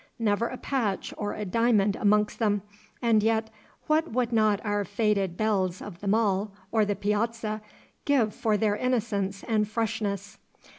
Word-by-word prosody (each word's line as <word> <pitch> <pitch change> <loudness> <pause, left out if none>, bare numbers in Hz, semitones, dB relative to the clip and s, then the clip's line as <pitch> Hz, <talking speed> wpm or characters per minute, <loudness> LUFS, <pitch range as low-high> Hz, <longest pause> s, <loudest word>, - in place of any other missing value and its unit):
Never 225 0 +1
a 255 - -6
patch 230 -10 -2
or 205 -1 -3
a 210 - -4
diamond 210 -1 +2
amongst 210 0 +2
them, 205 -3 +1 0.4
and 225 -2 +4
yet 220 0 +1 0.3
what 315 +2 +1
would 240 0 0
not 215 -3 +3
our 205 -1 0
faded 200 -3 0
belles 190 -4 0
of 170 - -9
the 205 - -6
Mall 205 -1 +2 0.2
or 220 -2 +3
the 205 0 -1
Piazza 215 +2 -1 0.4
give 245 -7 +2
for 215 -2 +1
their 210 -1 +1
innocence 210 -5 -1
and 215 -3 +1
freshness? 215 -2 -3
215 Hz, 155 wpm, -27 LUFS, 205-230 Hz, 0.4 s, and